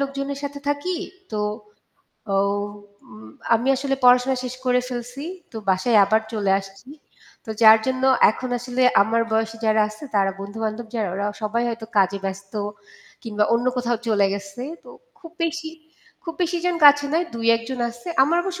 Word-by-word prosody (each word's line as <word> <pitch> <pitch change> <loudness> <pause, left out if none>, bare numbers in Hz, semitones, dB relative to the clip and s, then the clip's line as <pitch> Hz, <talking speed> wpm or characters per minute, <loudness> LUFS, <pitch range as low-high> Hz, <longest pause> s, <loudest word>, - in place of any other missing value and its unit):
লোকজনের 275 0 -3
সাথে 285 0 -5
থাকি 290 +6 -1 0.4
তো 210 - -1 0.9
আও 195 0 +2 0.6
উম 110 0 -12 0.3
আমি 235 +4 0
আসলে 270 +1 -1
পড়াশোনা 250 +1 +5
শেষ 250 0 -4
করে 250 0 +3
ফেলছি। 245 +3 -6 0.3
তো - - -8
বাসায় 190 +5 +2
আবার 220 +3 +2
চলে 205 -3 0
আসছি। 195 +5 -15 0.6
তো 225 - -7
যার 220 0 +9
জন্য 260 0 -1 0.3
এখন 255 +4 -6
আসলে 245 +1 -2 0.2
আমার 225 +3 +1
বয়সে 225 0 0
যারা 215 0 +3
আসছে 215 +5 -11
তারা 195 -1 +3
বন্ধু-বান্ধব 215 +3 -4
যারা 220 -4 -1
ওরা 200 +1 -2 0.2
সবাই 220 +3 0
হয়তো 230 -1 -5
কাজে 195 0 +3
ব্যস্ত 195 0 -5 0.7
কিংবা 210 -3 0
অন্য 240 +2 0
কোথাও 240 -1 0
চলে 205 -3 +3
গেছে। 200 +4 -7 0.2
তো - - -12 0.3
খুব 330 -1 -13
বেশি 325 -1 -3 0.5
খুব 330 -2 -5
বেশি 350 0 0
জন 355 -1 +1
কাছে 290 0 +8
নয় 340 +2 +1
২-১ 230 0 +2
জন 260 -2 -4
আসছে। 240 +5 -10
আমার 320 +5 +3
অবশ্য 360 -1 -5
235 Hz, 170 wpm, -22 LUFS, 215-275 Hz, 0.9 s, যার